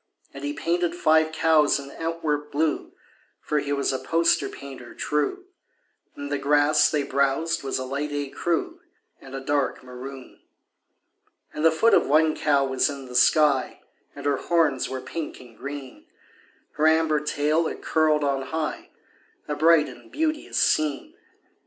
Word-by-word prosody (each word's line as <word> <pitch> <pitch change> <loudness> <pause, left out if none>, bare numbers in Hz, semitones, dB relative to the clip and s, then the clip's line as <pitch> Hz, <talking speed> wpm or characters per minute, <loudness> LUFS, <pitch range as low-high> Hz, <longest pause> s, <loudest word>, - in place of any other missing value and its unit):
And 140 0 -9
he 145 - -2
painted 170 +3 -1
five 160 -2 +3
cows 160 -2 +3
in 140 0 -9
Antwerp 155 -3 -3
blue 155 +1 -1 0.5
(For 150 - -1
he 145 0 -4
was 140 -1 0
a 130 - -2
poster 170 +1 +1
painter 135 -4 -10
true), 260 - -2 0.7
And 145 0 -7
the 145 - -1
grass 150 +1 +4
they 150 -2 0
browsed 140 +4 0
was 135 - -2
a 130 - -4
light 140 +3 -3
écru 165 - -2 0.4
And 135 0 -10
a - - -3
dark 140 -1 -1
maroon. 130 +1 -10 1.1
And 150 - -4
the 165 - +7
foot 160 +9 +3
of - - +4
one 155 +2 +3
cow 140 -2 +2
was 130 +2 +1
in 140 -2 -7
the 125 - -11
sky, 140 +1 +3 0.3
And - - -9
her 140 -1 +2
horns 155 -6 +1
were 130 -1 -4
pink 155 +4 -6
and 120 -3 -15
green; 140 -1 -8 0.6
Her 155 - +1
amber 160 -1 +3
tail 150 +2 0
it - - -7
curled 155 -2 +2
on 135 -1 -1
high 160 0 -4 0.6
A 150 - -2
bright 155 +1 +4
and - - -13
beauteous 310 0 -2
scene. 155 -8 +1
150 Hz, 160 wpm, -25 LUFS, 140-160 Hz, 1.1 s, the